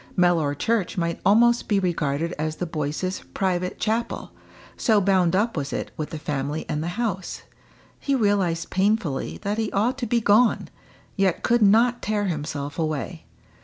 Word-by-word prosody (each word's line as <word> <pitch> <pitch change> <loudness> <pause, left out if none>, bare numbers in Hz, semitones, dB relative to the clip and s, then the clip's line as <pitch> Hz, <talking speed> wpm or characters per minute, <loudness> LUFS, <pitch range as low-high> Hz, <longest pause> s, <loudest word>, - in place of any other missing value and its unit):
Mellor 170 -5 +3
church 220 +3 -1
might 170 -1 -1
almost 235 +4 +4
be 205 -2 +2
regarded 165 -3 -1
as 155 0 -2
the 180 - -3
Boyces' 160 +3 -3
private 185 -1 -1
chapel, 230 +2 -2 0.4
so 220 -4 +3
bound 185 -3 +2
up 220 +4 +1
was 140 -3 -3
it - - -4
with 155 - -4
the 160 - -5
family 150 0 -3
and 150 - -2
the 165 - -3
house. 200 -6 -3 0.6
He 280 - 0
realised 200 -8 +1
painfully 190 -6 0
that 205 +2 -1
he 220 -2 -1
ought 235 +7 +1
to 240 - -2
be 235 +2 +2
gone 220 +2 +3 0.5
yet 195 -3 +1
could 240 0 +3
not 230 +4 +4
tear 210 0 -1
himself 145 -3 -4
away. 155 +1 -3
185 Hz, 165 wpm, -24 LUFS, 160-215 Hz, 0.6 s, almost